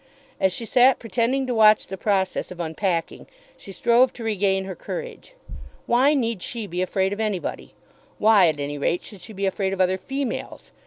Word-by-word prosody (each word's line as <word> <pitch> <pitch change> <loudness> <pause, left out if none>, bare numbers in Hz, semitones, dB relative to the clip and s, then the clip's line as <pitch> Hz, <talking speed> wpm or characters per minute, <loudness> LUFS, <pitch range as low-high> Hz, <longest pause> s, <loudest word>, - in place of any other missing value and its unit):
As 190 - +2
she 230 - -4
sat 250 +3 +4
pretending 245 +3 -1
to 255 - -2
watch 215 -1 +5
the 190 - -6
process 190 -1 -1
of 180 - -10
unpacking, 170 +1 -2 0.3
she 195 - -11
strove 240 +6 +3
to 235 - -9
regain 195 -3 0
her 190 - -5
courage. - - -8 0.5
Why 265 +5 +3
need 230 -7 -1
she 230 +2 -2
be 180 -1 -4
afraid 190 +1 0
of 205 - -7
anybody? 210 -5 -3 0.4
Why, 210 -4 +5
at 155 -2 -1
any 145 0 -4
rate, 170 +5 0
should 205 -4 -10
she 195 - -9
be 195 0 -3
afraid 190 0 -1
of 195 - -5
other 185 0 +2
females? 270 +4 -5
205 Hz, 190 wpm, -23 LUFS, 185-235 Hz, 0.5 s, watch